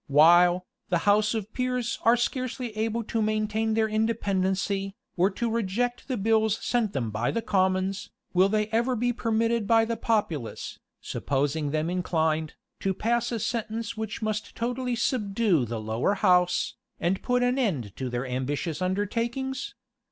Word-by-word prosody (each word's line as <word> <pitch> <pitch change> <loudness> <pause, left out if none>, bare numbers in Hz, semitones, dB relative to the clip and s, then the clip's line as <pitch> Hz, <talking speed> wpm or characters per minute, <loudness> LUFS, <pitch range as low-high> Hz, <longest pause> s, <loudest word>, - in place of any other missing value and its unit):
While, 175 +5 +6 0.2
the 175 - +3
house 210 +2 +4
of 220 0 -4
peers 250 -2 -1
are 235 +2 +5
scarcely 250 -1 -2
able 225 +1 -1
to 225 +1 -2
maintain 215 +1 0
their 220 -1 +2
independency, 200 -3 0 0.2
or 185 +2 +3
to 235 +4 -2
reject 230 +2 -1
the 255 -3 -1
bills 220 0 +2
sent 235 -4 0
them 115 -5 -2
by 110 +3 -1
the 230 0 -1
commons, 190 0 0 0.2
will 185 +2 +4
they 215 0 +1
ever 235 +3 +1
be 245 +1 +1
permitted 230 -1 0
by 225 0 +5
the 230 +1 -2
populace, 210 - -2 0.2
supposing 145 +2 -1
them 155 +2 0
inclined, 160 -3 0 0.2
to 190 -1 -1
pass 235 +4 0
a 235 - -1
sentence 225 0 -3
which 220 -1 -4
must 215 0 -3
totally 245 +1 -1
subdue 205 - +1
the 115 0 -4
lower 110 - 0
house, 180 -3 +3 0.3
and 180 +3 0
put 250 0 +1
an 250 +2 +2
end 145 - -1
to 130 -1 -3
their 120 +2 -2
ambitious 145 +6 -2
undertakings? 235 +8 -2
210 Hz, 155 wpm, -27 LUFS, 180-230 Hz, 0.3 s, While